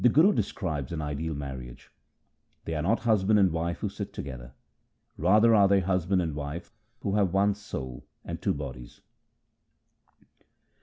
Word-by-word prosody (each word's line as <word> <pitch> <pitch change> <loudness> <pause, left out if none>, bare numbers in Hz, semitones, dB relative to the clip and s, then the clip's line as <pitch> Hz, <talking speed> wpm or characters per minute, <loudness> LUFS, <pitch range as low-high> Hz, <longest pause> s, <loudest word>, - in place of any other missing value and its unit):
The 125 - +7
Guru 165 - +5
describes 75 - -2
an 85 - -3
ideal 75 +1 -3
marriage: 65 -4 -8 0.4
— - - -44
They 80 - -3
are 75 - -1
not 100 +9 +1
husband 110 -2 +3
and 95 -3 +4
wife 85 +1 -2
who - - 0
sit - - -6
together: 65 -3 -7 0.6
Rather 105 +8 +5
are 100 -2 +6
they 100 0 +4
husband 90 0 +1
and 80 -3 -2
wife 75 +8 -6 0.3
who 100 - -1
have 95 -4 +2
one 100 +1 +4
soul 65 - -7 0.2
and - - -5
two - - +1
bodies. 65 -4 -8
85 Hz, 160 wpm, -28 LUFS, 70-100 Hz, 0.6 s, The